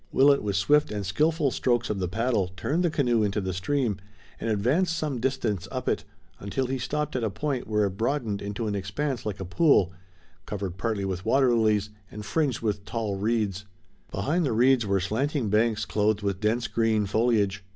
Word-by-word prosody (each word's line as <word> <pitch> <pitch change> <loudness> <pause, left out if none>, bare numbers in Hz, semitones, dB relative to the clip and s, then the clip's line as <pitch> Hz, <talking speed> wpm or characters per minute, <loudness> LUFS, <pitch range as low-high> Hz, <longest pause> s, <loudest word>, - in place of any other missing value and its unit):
Willet, 140 +1 +5
with 100 -2 -2
swift 145 - +3
and 105 -2 -3
skillful 150 - +1
strokes 120 -2 0
of 100 - -2
the 90 - -1
paddle, 110 +1 0
turned 165 - 0
the 175 - +3
canoe 125 -7 +1
into 105 0 0
the 95 -2 -3
stream 110 +3 0 0.4
and 115 - -2
advanced 145 - +1
some 150 -6 -2
distance 115 -7 -1
up - - -4
it, - - 0 0.3
until 100 +7 -2
he 130 +1 -2
stopped 150 +3 -2
at 125 - -1
a 110 - +1
point 135 +4 -3
where 105 -1 +2
it 100 - -1
broadened 115 -4 -1
into 105 +3 -4
an 105 - -1
expanse 110 +7 -3
like 100 -3 -4
a 95 - -4
pool, 95 - +3 0.5
covered 100 -4 -4
partly 105 -2 -1
with 95 -1 -3
water 125 +3 +3
lilies, 105 -3 +2 0.2
and 105 0 -8
fringed 140 0 0
with 105 -3 -1
tall 110 -2 -3
reeds. 105 -2 -1 0.4
Behind 170 +5 0
the 135 - 0
reeds 120 0 +4
were 100 0 +2
slanting 120 - -1
banks 110 +1 +2
clothed 105 0 0
with 100 -2 -1
dense, 110 +3 0
green 110 -2 +1
foliage. 100 -2 +1
110 Hz, 195 wpm, -26 LUFS, 100-130 Hz, 0.5 s, Willet